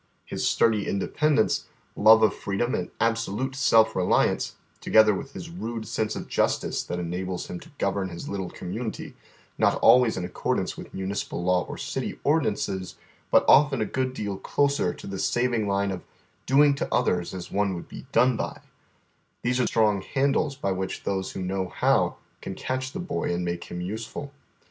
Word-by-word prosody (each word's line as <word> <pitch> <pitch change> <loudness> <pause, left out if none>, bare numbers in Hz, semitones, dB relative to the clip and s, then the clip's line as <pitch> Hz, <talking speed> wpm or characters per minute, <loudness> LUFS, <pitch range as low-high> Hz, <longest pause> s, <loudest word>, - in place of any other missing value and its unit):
His - - -1
sturdy 110 -3 +2
independence, 140 +5 +1 0.3
love 110 0 +7
of 110 - +4
freedom 100 +5 -2
and 90 - -2
absolute 115 +3 0
self 115 -5 +4
reliance, 90 -1 +1 0.2
together 110 -1 +5
with 135 +8 -6
his 170 - -8
rude 115 -9 -5
sense 110 -1 -1
of - - -6
justice - - 0
that 90 - -4
enables 90 +1 -3
him 90 - -6
to - - -14
govern 100 -1 -1
his 85 -1 -7
little 95 -2 -3
community, 110 +7 -5 0.5
not - - +4
always 125 -4 +6
in 90 - -2
accordance 90 - -2
with - - -10
municipal 95 -2 -3
law 90 0 +2
or - - -6
city - - -4
ordinances, 100 - 0 0.3
but - - +5
often 140 -2 +6
a 110 - +1
good 130 +1 -2
deal 100 -4 -3
closer 140 +6 +1
to - - -11
the 100 -1 -5
saving 120 -2 +1
line 100 0 +1
of 90 -2 -4 0.3
" - - -40
doing 140 +2 +5
to 140 - -4
others 90 -8 +1
as 90 - -7
one 100 -2 0
would 85 - -7
be - - -10
done 125 +2 +4
by - - -4 0.3
" - - -39
— - - -44
these 125 +1 +1
are 125 - +2
strong 105 -3 +2
handles 140 +4 0
by 100 -7 -2
which 95 0 -3
those 95 -1 -2
who 95 - -4
know 95 0 -2
how - - +2 0.2
can - - -6
catch 130 0 -3
the - - -6
boy 175 - -2
and 90 0 -1
make 85 0 -3
him 90 - -6
useful. 110 +9 -5
110 Hz, 185 wpm, -26 LUFS, 95-125 Hz, 0.5 s, love